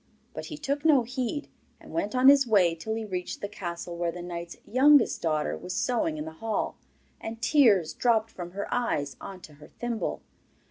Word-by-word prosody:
But - - -6
he 305 - -7
took 285 0 -2
no 295 -6 +5
heed, 255 +4 -3 0.3
and - - -13
went 260 -9 -1
on 255 +1 +5
his 275 -2 +7
way 190 -6 +4
till 195 +7 -4
he 225 -1 -3
reached 180 -3 -4
the 205 - -4
castle 175 -4 -6
where 170 0 -1
the 175 +1 -8
knight's 170 -1 -6
youngest 270 +3 +5
daughter 155 -2 0
was 180 0 -6
sewing 225 -11 0
in 150 - -4
the 160 - -6
hall. 220 +7 -2 0.4
And 225 0 -6
tears 225 - +4
dropped 225 -2 +1
from 175 -1 -8
her 200 +1 -4
eyes 145 - -1
on 190 -2 -8
to 155 - -13
her - - -12
thimble. 240 -2 -4
215 Hz, 195 wpm, -27 LUFS, 175-250 Hz, 0.4 s, his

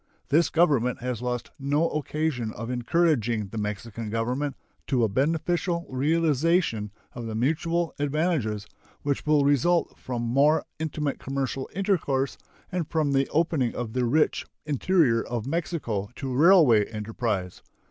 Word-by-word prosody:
This 155 +2 +4
Government 140 -9 +2
has 125 -2 -3
lost 125 -1 -3
no 145 +4 +1
occasion 150 -6 -2
of 115 +3 -5
encouraging 120 - +1
the 110 - -5
Mexican 105 +1 -4
Government 125 +6 -1 0.3
to 125 -3 +2
a - - +4
beneficial 165 - 0
realization 150 - +1 0.2
of 120 -2 -6
the 110 - -4
mutual 165 +7 0
advantages 145 - 0 0.4
which 140 +1 -2
will 150 -2 +4
result 155 +5 +2
from 120 -2 -4
more 140 +6 +3
intimate 150 -2 -2
commercial 135 0 -3
intercourse 155 -9 0 0.3
and 180 -4 -2
from 155 -3 +1
the 135 0 +2
opening 155 -6 +1
of 115 -3 -4
the 125 - 0
rich 150 +6 +2 0.2
interior 150 -4 +2
of 120 -2 -4
Mexico 135 - -2
to 130 -1 -4
railway 145 - +6
enterprise. 105 -3 -3
135 Hz, 135 wpm, -26 LUFS, 115-160 Hz, 0.4 s, railway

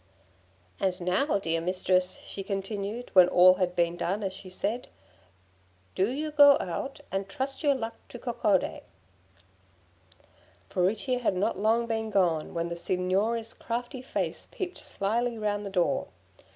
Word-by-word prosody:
'And 185 -1 0
now, 195 - +1
dear 165 -4 -1
mistress,' 185 +1 +1
she 195 - -5
continued, 200 +4 -4
when 185 -2 +8
all 180 +1 +7
had 180 -1 -1
been 170 0 +1
done 200 +5 -1
as 190 -1 -2
she 190 - -8
said, 215 +6 -3 1.1
'do 190 +3 +1
you 300 +4 -3
go 285 -2 +8
out 265 +11 -4
and 195 0 -2
trust 265 +6 -4
your 290 -3 +3
luck 230 -3 -4 0.2
to - - -8
Coccodé.' 230 -5 0 1.9
Furicchia 205 +7 +1
had 230 -6 0
not 185 0 0
long 225 +3 +2
been 220 -1 -2
gone, 175 -6 +1
when 170 0 -1
the 170 - -3
Signora's 195 +6 0
crafty 245 +2 -4
face 260 - -3
peeped 365 -1 -4
slyly 230 +4 -1
round 205 -1 -2
the - - -4
door. 235 +10 +1
200 Hz, 145 wpm, -28 LUFS, 185-240 Hz, 1.9 s, when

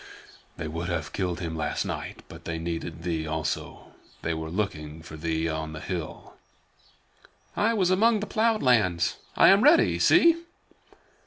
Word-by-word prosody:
"They 80 - -4
would 85 +3 -4
have 80 -4 -3
killed 90 -2 -2
him 80 -2 -4
last 75 -2 -2
night, - - -6
but - - -12
they 85 -1 -3
needed 85 0 -5
thee 80 -3 -2
also. 80 0 -4 0.3
They 85 - 0
were 80 0 -5
looking 80 -5 -4
for 80 - -10
thee 80 +1 -1
on 80 -1 -4
the 75 - -6
hill." 85 -3 -6 1.2
"I 225 +2 +2
was 185 -4 +2
among 220 +4 +4
the 210 - -3
plowed 220 0 +1
lands. 105 -10 +2 0.2
I 170 - +7
am 195 +2 +6
ready. 310 +4 +5
See!" 335 -1 +5
85 Hz, 160 wpm, -26 LUFS, -, 1.2 s, I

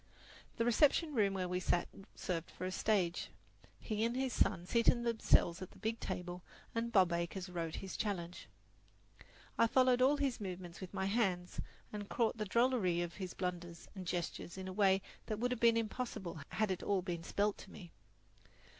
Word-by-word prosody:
The 230 - +1
reception 295 +6 +4
room 200 -5 +2
where 185 -1 -1
we 180 0 -1
sat 175 -1 +1 0.3
served 170 -3 -3
for 185 - -6
a 185 - -2
stage. 185 -4 +1 0.5
He 215 -1 -2
and 235 +1 +1
his 260 -2 0
son 170 - +2
seated 235 +3 +3
themselves 220 -7 +3
at 185 - -6
the - - -18
big 225 +3 -2
table, 180 0 -4 0.3
and 230 +1 -1
Bob 185 -5 +5
Acres 170 +2 -2
wrote 165 -2 -3
his 190 -1 -6
challenge. 180 -5 -3 1.1
I 230 - +6
followed 255 +1 +4
all 275 +3 +5
his 275 -5 0
movements 180 -2 -6
with 185 - -6
my 190 -1 -2
hands, 190 -4 0 0.3
and 205 -1 -5
caught 230 -1 +1
the 215 - 0
drollery 210 -6 +2
of 170 -1 -5
his 185 -3 -5
blunders 175 -2 -4
and 190 -3 -7
gestures 175 0 -3
in 190 0 -5
a 185 - -5
way 195 -1 +4 0.2
that 215 - -2
would 245 +3 0
have 250 - -1
been 230 -1 +5
impossible 215 -6 -3
had 215 -2 0
it 185 - -2
all 195 -3 +1
been 175 -2 -3
spelled 205 +4 0
to - - -11
me. 175 -5 -11
195 Hz, 185 wpm, -36 LUFS, 180-230 Hz, 1.1 s, I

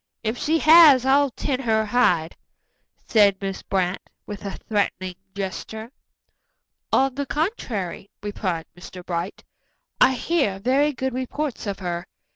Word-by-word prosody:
If 220 +1 -1
she 310 +6 +1
has, 310 -5 +7
I'll 280 +1 +4
tan 260 +1 -3
her 220 -4 +1
hide," 180 -8 +1 0.7
said 205 -3 +4
Miss 195 -1 -4
Brant, 185 -1 -1 0.2
with 210 -1 -8
a 200 -1 -5
threatening 200 -3 -1 0.2
gesture. 220 +4 -6 1.0
"On 270 0 +3
the 280 +1 -4
contrary," 245 - -3
replied 185 -5 -3
Mr. 175 0 -11
Bright, 175 +2 -4 0.6
"I 265 - +6
hear 275 - 0
very 270 +8 +2
good 260 -1 -3
reports 260 0 -4
of 200 - -3
her. 175 -2 -4
220 Hz, 130 wpm, -23 LUFS, 190-270 Hz, 1.0 s, has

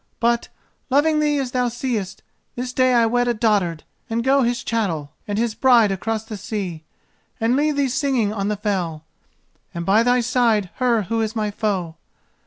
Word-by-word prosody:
But, 235 0 +1 0.4
loving 305 +3 +3
thee 295 -1 +2
as 265 -3 -2
thou 250 -1 +1
seest, 230 -6 -3 0.3
this 250 0 -4
day 255 -1 +3
I 235 -1 +5
wed 245 +2 +1
a 240 - +1
dotard, 200 -8 +1 0.3
and 230 +1 -1
go 270 +2 +3
his 240 0 0
chattel 165 -11 -2
and 205 0 -2
his 230 0 0
bride 230 -2 +4
across 215 +3 -2
the 220 -1 -7
sea, 190 -5 -5 0.6
and 230 +3 +2
leave 295 +1 +1
thee 280 -1 +1
singing 255 -5 0
on 200 -2 -2
the 210 0 -1
fell, 180 -7 -2 0.7
and 170 0 -4
by 205 +4 +4
thy 245 +1 +3
side 235 -5 +1
her 240 -4 +2
who 225 +4 -1
is 220 0 -2
my 210 -2 -1
foe. 190 -6 -2
225 Hz, 185 wpm, -21 LUFS, 205-250 Hz, 0.7 s, I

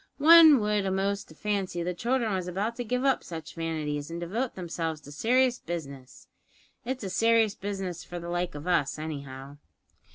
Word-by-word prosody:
One 315 -1 +8
would 210 -1 0
a'most 195 +1 -1
fancy 195 -3 -2
the 180 +1 -2
childr'n 235 +3 0
was 185 -2 -2
about 200 +6 -2
to 245 - -2
give 250 +3 -1
up 270 -2 +2
such 165 -1 -8
vanities 155 -3 -3
an' 165 - -5
devote 215 +9 -3
themselves 165 -3 -3
to 145 - -12
serious 250 - +2
business. 140 -6 -7 0.6
It's 255 0 -4
a 195 - -3
serious 225 -1 +3
business 195 -4 -5
for 175 - -8
the 170 0 -7
like 175 -2 -2
of 145 +2 -7
us, 170 -6 +1
anyhow." 140 -3 -7
180 Hz, 170 wpm, -28 LUFS, 160-225 Hz, 0.6 s, One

